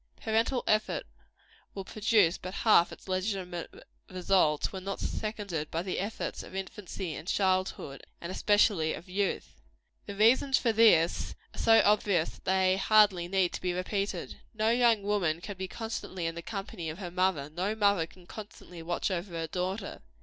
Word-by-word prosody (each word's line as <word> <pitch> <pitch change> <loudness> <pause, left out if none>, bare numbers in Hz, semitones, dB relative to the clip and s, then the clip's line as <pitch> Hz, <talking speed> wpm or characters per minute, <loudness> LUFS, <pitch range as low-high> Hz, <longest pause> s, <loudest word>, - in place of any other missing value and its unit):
Parental 225 +3 0
effort 215 0 +1 0.7
will 195 -1 -5
produce 210 -5 +2
but 185 +1 -7
half 210 -6 +4
its - - -12
legitimate 185 -2 -3 0.3
results, 180 -4 +1
when 190 -1 -6
not 195 +1 -4
seconded 200 -8 -3
by 165 +1 -2
the 185 - -3
efforts 205 +4 -4
of - - -11
infancy 190 -2 -5
and 160 - -8
childhood, 185 -8 0 0.2
and 170 - -6
especially 200 -5 +2
of 170 - -11
youth. 195 +1 -3 0.5
The 200 - -6
reasons 255 +6 +4
for 235 - +1
this 195 -7 +4 0.2
are - - -9
so 225 0 +6
obvious 200 -5 +2
that - - -18
they 190 0 +3
hardly 200 -4 +4
need 185 -1 +1
to - - -5
be 180 -1 -1
repeated. 195 +3 -3 0.2
No 220 +1 +2
young 235 -3 +3
woman 190 -6 0
can 200 +3 -7
be 190 0 -5
constantly 205 -4 -5
in 165 - -1
the 170 - -6
company 195 -5 -5
of 155 - -6
her 180 -3 -6
mother; 180 -6 0
no 185 +6 -2
mother 200 -6 +2
can 180 +1 -18
constantly 185 -4 -10
watch 175 +4 -2
over 180 0 -3
her 165 0 -2
daughter. 185 +5 -4
190 Hz, 170 wpm, -29 LUFS, 175-210 Hz, 0.7 s, so